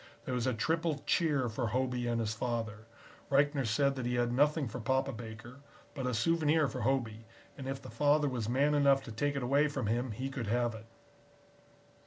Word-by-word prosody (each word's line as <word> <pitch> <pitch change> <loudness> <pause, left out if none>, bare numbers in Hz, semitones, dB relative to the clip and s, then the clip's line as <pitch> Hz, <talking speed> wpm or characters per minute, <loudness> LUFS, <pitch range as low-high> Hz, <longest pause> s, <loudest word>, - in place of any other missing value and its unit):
There 130 - -3
was 125 0 0
a 130 - +2
triple 160 +4 -1
cheer 150 -7 +2
for 115 +1 -2
Hobey 125 +1 -1
and 120 -1 0
his 110 -1 -1
father. 110 -2 -3 0.4
Reichner 140 -2 +2
said 140 +5 +2
that 130 -3 -4
he 125 - 0
had 120 0 +1
nothing 145 +2 +2
for 120 +3 -6
Papa 130 +4 0
Baker, 115 +3 -9 0.3
but 135 -4 -3
a 125 - -1
souvenir 155 +3 +2
for 130 -2 -5
Hobey, 115 -3 -1 0.3
and 135 -2 -7
if 135 0 -3
the 130 - -11
father 145 +5 +3
was 120 -5 -2
man 140 +4 +2
enough 140 -2 +4
to 115 - -8
take 140 +6 -1
it 140 - -2
away 140 +4 +3
from 145 - -3
him 120 +4 0
he 130 +5 -4
could 130 -5 -4
have 120 +1 +1
it. 110 0 -10
130 Hz, 205 wpm, -32 LUFS, 115-140 Hz, 0.4 s, enough